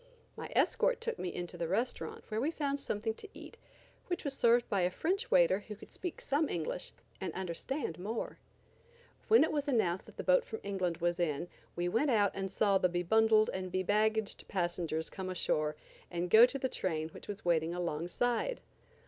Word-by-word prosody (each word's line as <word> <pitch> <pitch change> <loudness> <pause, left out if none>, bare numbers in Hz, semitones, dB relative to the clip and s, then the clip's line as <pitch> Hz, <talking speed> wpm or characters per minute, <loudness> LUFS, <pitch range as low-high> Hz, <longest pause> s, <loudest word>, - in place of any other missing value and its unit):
My - - -7
escort - - +3
took 470 -1 -3
me 180 - -2
into 175 -1 -5
the 170 - -1
restaurant 225 +8 -2
where 215 0 -1
we 285 - +1
found 285 -3 -1
something 220 -3 -2
to 415 - -11
eat, - - -11 0.5
which 355 0 -2
was 280 -3 -1
served 240 -1 +4
by 200 -3 +1
a 180 - +3
French 385 - -1
waiter - - +5
who 210 0 -9
could - - -14
speak 360 -3 -5
some 290 +2 +1
English 170 +1 -3 0.3
and 190 - -3
understand 185 - -3
more. 215 +5 -4 0.9
When 445 -4 +7
it 315 - +1
was 295 -1 -1
announced 200 -9 +1
that - - -15
the - - -4
boat - - +4
from 460 -3 -6
England 185 -4 -1
was 175 +1 0
in 170 0 -1 0.3
we 175 0 -1
went 230 +11 +2
out 205 -5 +4
and 195 0 -3
saw 195 0 +3
the 180 - +3
be 175 0 -1
bundled 220 +3 +4
and 185 -1 -4
be 185 +1 0
baggaged 215 +2 +1
passengers 170 -3 -2
come 190 -1 -5
ashore 155 -4 0 0.3
and 175 0 -3
go 230 +3 +9
to 275 - -4
the 265 - 0
train 160 -9 -2
which - - -12
was 205 -1 -7
waiting 170 0 +2
alongside. 180 - -1
200 Hz, 195 wpm, -33 LUFS, 175-265 Hz, 0.9 s, go